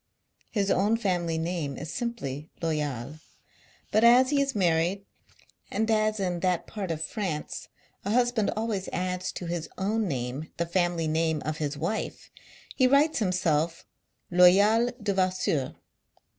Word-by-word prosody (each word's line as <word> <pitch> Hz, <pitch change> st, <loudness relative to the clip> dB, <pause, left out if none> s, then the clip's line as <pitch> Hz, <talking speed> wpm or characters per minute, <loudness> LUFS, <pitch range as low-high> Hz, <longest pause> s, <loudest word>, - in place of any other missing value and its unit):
His 200 Hz, -2 st, 0 dB
own 210 Hz, +4 st, +3 dB
family 175 Hz, -6 st, 0 dB
name 160 Hz, -4 st, -2 dB
is 155 Hz, +2 st, -6 dB
simply 160 Hz, -, -4 dB
Loyal; 150 Hz, -4 st, -3 dB, 0.7 s
but, 215 Hz, -, +3 dB
as 250 Hz, +3 st, +6 dB
he 285 Hz, -1 st, +3 dB
is 275 Hz, -1 st, -1 dB
married, 180 Hz, +1 st, +1 dB, 0.6 s
and 220 Hz, 0 st, 0 dB
as 215 Hz, 0 st, +2 dB
in 180 Hz, -3 st, -1 dB
that 180 Hz, -1 st, 0 dB
part 200 Hz, -4 st, -5 dB
of 160 Hz, -1 st, -2 dB
France 185 Hz, -9 st, -4 dB, 0.4 s
a 200 Hz, -, -3 dB
husband 240 Hz, -1 st, +2 dB
always 215 Hz, -4 st, -2 dB
adds 180 Hz, +1 st, -2 dB
to 180 Hz, -, -6 dB
his 170 Hz, -1 st, -3 dB
own 210 Hz, +3 st, 0 dB
name 135 Hz, +1 st, -4 dB
the 170 Hz, -, 0 dB
family 175 Hz, -1 st, 0 dB
name 160 Hz, 0 st, +1 dB
ot 155 Hz, 0 st, -2 dB
his 150 Hz, -1 st, -3 dB
wife, 170 Hz, +9 st, -3 dB, 0.4 s
he 255 Hz, -, +4 dB
writes 285 Hz, +3 st, +4 dB
himself 170 Hz, -5 st, 0 dB, 0.5 s
Loyal 200 Hz, +7 st, +6 dB
Devasseur. 185 Hz, -, 0 dB
180 Hz, 140 wpm, -27 LUFS, 160-215 Hz, 0.7 s, as